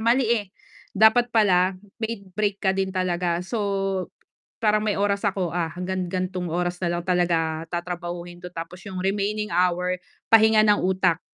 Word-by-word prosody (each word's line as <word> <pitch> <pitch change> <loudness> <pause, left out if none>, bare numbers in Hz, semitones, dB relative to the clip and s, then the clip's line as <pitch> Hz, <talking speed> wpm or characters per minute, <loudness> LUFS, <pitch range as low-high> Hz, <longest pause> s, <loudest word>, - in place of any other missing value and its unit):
mali, 235 +3 +3
eh, 220 -4 +1 0.5
dapat 220 +3 +5
pala, 190 -5 +3 0.2
may 220 -3 -3
break 205 -1 0
ka 190 -2 +2
din 190 0 -1
talaga. 180 -2 -1
So, 215 +4 -3 1.0
"Parang, 215 -1 +2
may 210 - 0
oras 200 +1 0
ako, 185 -4 -2
ah, 170 -2 -1
hanggang 180 0 -3
gan'tong 180 -1 -3
oras 175 +1 -2
na 175 -1 0
lang 175 - -4
talaga 165 -3 0
tatrabahuhin 175 0 -5
'to", 180 - -7
tapos 165 +2 -7
yung 185 -1 -5
remaining 210 +1 -1
hour, 180 +1 +1 0.3
pahinga 220 -1 +6
ng 210 -1 +4
utak, 185 -2 +1
185 Hz, 160 wpm, -24 LUFS, 175-210 Hz, 1.0 s, pahinga